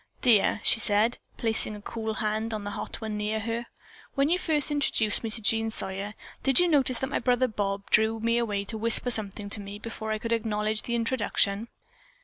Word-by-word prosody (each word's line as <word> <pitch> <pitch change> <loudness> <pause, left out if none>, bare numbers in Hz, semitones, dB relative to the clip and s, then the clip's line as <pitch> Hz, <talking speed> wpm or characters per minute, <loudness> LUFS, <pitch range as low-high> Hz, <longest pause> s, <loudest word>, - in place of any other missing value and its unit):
"Dear," 220 -3 +4
she - - +4
said, 215 +2 +2 0.2
placing 220 -2 0
a 205 - -10
cool 220 -1 -4
hand 215 +2 -2
on 210 - -5
the 205 - -5
hot - - -5
one 220 -1 -4
near 210 +1 -1
her, 230 +2 -3 0.5
"when 275 +1 +2
you 355 +2 +2
first 305 -4 0
introduced 240 -8 +1
me 225 - -2
to 220 0 -5
Jean 225 +1 +2
Sawyer, 200 -1 -2 0.3
did 270 -1 +3
you 355 - +4
notice 270 -6 +2
that 265 +3 -3
my - - 0
brother 250 0 +2
Bob 200 -3 -3
drew 220 +1 +3
me 230 +1 +1
away 205 -4 -1
to 220 +2 -3
whisper 230 +2 +6
something 205 -2 -1
to 210 - -1
me 200 +1 -8
before 220 0 -6
I 215 - 0
could 230 +2 -5
acknowledge 215 -1 0
the 235 - -3
introduction?" 230 -3 0
220 Hz, 205 wpm, -27 LUFS, 210-235 Hz, 0.5 s, whisper